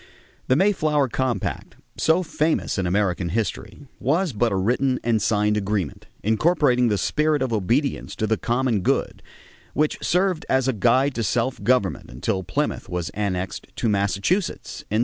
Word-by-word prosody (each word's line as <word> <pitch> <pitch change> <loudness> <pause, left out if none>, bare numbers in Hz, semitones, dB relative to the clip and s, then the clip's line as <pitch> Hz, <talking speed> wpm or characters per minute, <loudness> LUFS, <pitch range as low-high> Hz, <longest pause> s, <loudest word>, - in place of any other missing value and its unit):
The 130 - +4
Mayflower 155 -6 +2
Compact, 130 +1 -2 0.2
so 165 +3 +2
famous 155 - 0
in 95 - 0
American 90 -2 0
history, 105 - -3 0.2
was 160 +3 +1
but 115 +2 +1
a - - 0
written 125 +7 +1
and 115 -2 +1
signed 105 -1 +2
agreement, 100 -6 -2 0.2
incorporating 125 - +3
the 105 -2 +1
spirit 150 - +1
of 125 -3 -2
obedience 120 +8 0
to 110 - -1
the 110 +1 +2
common 120 -2 0
good, - - 0 0.5
which 150 +1 +1
served 180 -2 +1
as 130 -1 +2
a 130 - +2
guide 130 +6 +3
to 115 - -2
self 120 +5 -1
government 125 -6 +1
until 95 - -2
Plymouth 90 0 -2
was 90 -1 -3
annexed 95 -3 -3
to - - -1
Massachusetts 100 - 0
in 105 - 0
1691. - - +2
115 Hz, 160 wpm, -23 LUFS, 100-140 Hz, 0.5 s, The